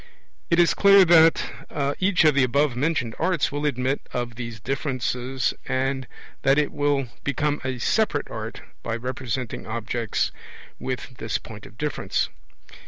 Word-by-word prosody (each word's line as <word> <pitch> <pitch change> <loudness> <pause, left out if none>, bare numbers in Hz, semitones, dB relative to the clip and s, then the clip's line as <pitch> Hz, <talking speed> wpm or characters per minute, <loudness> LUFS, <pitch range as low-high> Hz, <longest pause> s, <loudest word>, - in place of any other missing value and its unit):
It 170 - +3
is 175 - +5
clear 200 -1 +7
that 160 -3 +3
each 185 -3 +3
of 155 - +6
the 140 -1 +4
above 140 +1 +2
mentioned 130 -4 0
arts 175 -2 +1
will 145 +1 -1
admit 130 0 0
of 120 -1 -3
these 115 -1 -6
differences, 130 -1 -1
and 130 0 -1 0.3
that 135 +1 +4
it 150 -1 +2
will 145 -3 0
become 145 +2 0
a 130 -1 -2
separate 150 - +1
art 110 +1 -6 0.2
by 115 - -3
representing 125 -1 -4
objects 115 0 -1 0.5
with 130 -1 -5
this 110 -2 -2
point 105 -2 -11
of 110 - -18
difference. 150 +1 -1
130 Hz, 145 wpm, -24 LUFS, 120-150 Hz, 0.5 s, clear